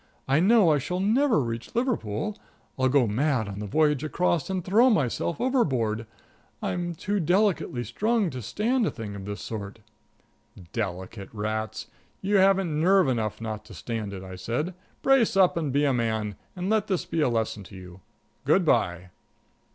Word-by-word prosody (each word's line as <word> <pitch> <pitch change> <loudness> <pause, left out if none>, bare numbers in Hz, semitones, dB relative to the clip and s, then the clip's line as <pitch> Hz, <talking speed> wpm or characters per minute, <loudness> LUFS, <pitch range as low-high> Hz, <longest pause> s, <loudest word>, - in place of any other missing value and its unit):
I 135 +3 +3
know 200 -1 +5
I 150 - +3
shall 180 +7 -3
never 230 - +3
reach 115 - -4
Liverpool. 215 - -1 0.4
I'll 130 0 +2
go 135 -1 +4
mad 125 +1 0
on 100 0 -6
the 105 - -4
voyage 150 +4 +2
across, 170 0 0
and 185 -2 -2
throw 225 +7 +5
myself 155 - 0
overboard. 125 - 0 0.5
I'm 175 -1 -3
too 205 +5 -1
delicately 180 - +1
strung 215 - 0
to 130 - -6
stand 220 - 0
a - - +2
thing 105 -3 -7
of 95 -1 -7
this 100 0 -5
sort." 105 -1 -6 1.0
"Delicate 95 -1 -4
rats! 110 +1 -3 0.3
You 200 +1 +1
haven't 190 -5 +3
nerve 190 -1 +5
enough 110 -4 -1
not 110 -1 -5
to - - -12
stand 110 -4 -4
it," 95 -1 -7
I 95 -1 -8
said. 125 - -2 0.3
"Brace 270 -7 +4
up 185 -2 +5
and 155 -5 -1
be 145 +2 +2
a 140 - +2
man, 110 -4 -1 0.2
and 180 0 -3
let 215 0 +1
this 185 -3 -1
be 165 - -1
a 145 - +3
lesson 110 -3 -1
to - - -13
you. 90 0 -11 0.4
Good - - +3
by." 90 +1 +1
140 Hz, 175 wpm, -26 LUFS, -, 1.0 s, know